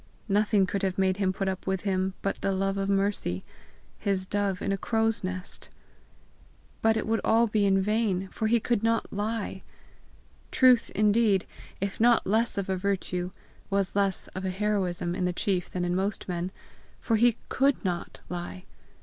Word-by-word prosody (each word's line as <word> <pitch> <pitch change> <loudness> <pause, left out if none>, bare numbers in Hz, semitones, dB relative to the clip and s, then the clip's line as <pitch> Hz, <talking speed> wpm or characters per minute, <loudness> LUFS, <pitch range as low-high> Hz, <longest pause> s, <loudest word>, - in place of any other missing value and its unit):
Nothing 205 -1 +3
could 195 +1 -2
have 190 -2 -1
made 190 -1 +2
him 195 -2 +1
put 195 +1 -3
up 190 0 -3
with 190 -1 0
him 190 -1 0
but 195 - -2
the 195 - +1
love 195 0 0
of 195 0 -1
Mercy, 195 - 0 0.6
his 195 -2 0
dove 200 -1 -1
in 195 - -2
a - - +2
crow's 225 +2 0
nest! 185 0 -5 1.1
But 225 0 +3
it 220 - -1
would 225 0 +1
be - - -28
all 230 +1 +4
in 200 -2 +3
vain, 200 -2 0
for 220 - -2
he 235 +2 +4
could 235 -1 0
not 225 0 0
lie! 205 -2 -2 0.9
Truth, 255 -3 +5
indeed, 210 -2 +3 0.3
if 195 0 -3
not 235 +1 +4
less 225 +3 +1
of 200 - -1
a 190 - 0
virtue, 185 -2 -1 0.4
was 195 -1 0
less 200 -2 0
of 190 - -6
a 190 - -1
heroism 185 -3 -1
in 185 0 -1
the 180 - 0
chief 180 -1 -1
than 180 -1 -2
in 175 0 0
most 195 +2 -2
men, 175 0 -2 0.5
for 230 - +1
he 235 0 +4
COULD 270 -4 +2
NOT 175 -2 -3
lie. 180 +1 -6
195 Hz, 180 wpm, -28 LUFS, 185-215 Hz, 1.1 s, Truth